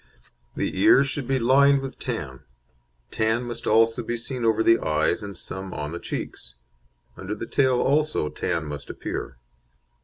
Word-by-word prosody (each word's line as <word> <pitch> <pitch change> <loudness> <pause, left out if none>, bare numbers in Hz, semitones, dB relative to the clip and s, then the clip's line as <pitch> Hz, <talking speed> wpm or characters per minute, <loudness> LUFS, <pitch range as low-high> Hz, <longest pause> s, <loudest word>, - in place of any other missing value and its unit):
The - - -2
ears 135 +1 +6
should 135 -2 -3
be 135 - +1
lined 135 +3 +4
with 135 0 -7
tan; 70 - -4 0.7
tan 110 +2 0
must 120 -1 -6
also 115 +2 +4
be 120 +1 -3
seen 125 +1 -5
over 110 -1 +3
the 115 0 +5
eyes, 80 +6 0
and 100 -3 -7
some 95 0 -6
on 75 0 -4
the 85 - -5
cheeks. - - -6 0.6
Under 95 +3 -5
the - - -6
tail 130 0 +2
also 150 - +1
tan 75 - -2
must 75 -1 -7
appear. - - -5
115 Hz, 160 wpm, -24 LUFS, 95-130 Hz, 0.7 s, ears